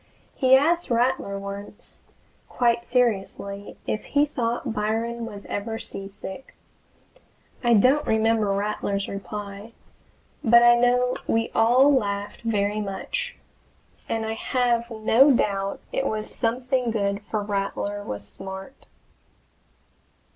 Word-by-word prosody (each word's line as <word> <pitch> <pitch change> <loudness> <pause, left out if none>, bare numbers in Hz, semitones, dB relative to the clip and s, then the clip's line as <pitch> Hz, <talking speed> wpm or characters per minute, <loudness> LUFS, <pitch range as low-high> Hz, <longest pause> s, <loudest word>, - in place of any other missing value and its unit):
He 260 -1 +5
asked 335 +6 +2
Rattler 235 -4 +1
once, 200 +1 -9 0.5
quite 235 -1 +1
seriously, 200 -4 -1
if 215 - -2
he 290 0 +2
thought 240 -3 -2
Byron 230 +2 -2
was 205 -2 -9
ever 225 +2 -3
seasick. 195 +4 -8 1.1
I 240 -1 +5
don't 260 +8 +4
remember 220 -1 +2
Rattler's 200 0 -1
reply, 200 +2 -7 0.7
but 235 +1 +7
I 240 0 +8
know 245 +1 +2
we 225 0 +1
all 250 +5 +5
laughed 205 -5 -1
very 210 -2 0
much, 205 - -4 0.7
and 225 -1 -1
I 220 - -2
have 235 0 0
no 225 +5 +4
doubt 200 -6 +1
it - - 0
was 215 0 -3
something 250 +1 0
good 200 -2 -1
for 210 +2 -1
Rattler 205 0 -2
was 100 - -5
smart. 190 - -9
225 Hz, 115 wpm, -24 LUFS, 200-245 Hz, 1.1 s, I